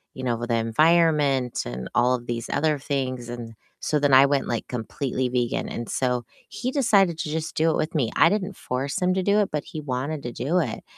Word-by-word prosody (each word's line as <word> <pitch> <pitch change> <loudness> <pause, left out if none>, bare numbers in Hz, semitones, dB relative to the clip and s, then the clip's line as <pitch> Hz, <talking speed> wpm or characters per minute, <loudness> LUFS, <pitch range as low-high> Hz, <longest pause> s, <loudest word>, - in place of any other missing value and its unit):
you 130 - -7
know, 120 -2 -1
the 120 - 0
environment 145 +1 +2
and 60 +1 -5
all 125 +1 +4
of 120 -1 -8
these 120 -1 -4
other 155 -1 +1
things. 130 -4 -3
And 120 -2 -7 0.3
so 150 - 0
then 140 -2 +2
I 135 +1 +9
went, 140 -1 0
like, 115 - -3
completely 125 +2 -3
vegan, 125 -1 -1
and 120 - -5
so 125 -2 -1 0.2
he 255 +3 -3
decided 200 - +3
to 155 - -3
just 160 +1 -3
do 160 +1 +3
it - - 0
with 155 - -2
me. 130 -7 +1
I 165 - +6
didn't 200 0 -2
force 130 +3 -3
him 180 0 +2
to 190 - 0
do 200 +2 +3
it, 205 - +1
but 150 -1 -2
he 155 - -7
wanted 140 +2 -3
to 120 - -4
do 160 +10 0
it, 130 -10 -3
135 Hz, 225 wpm, -24 LUFS, 120-160 Hz, 0.3 s, I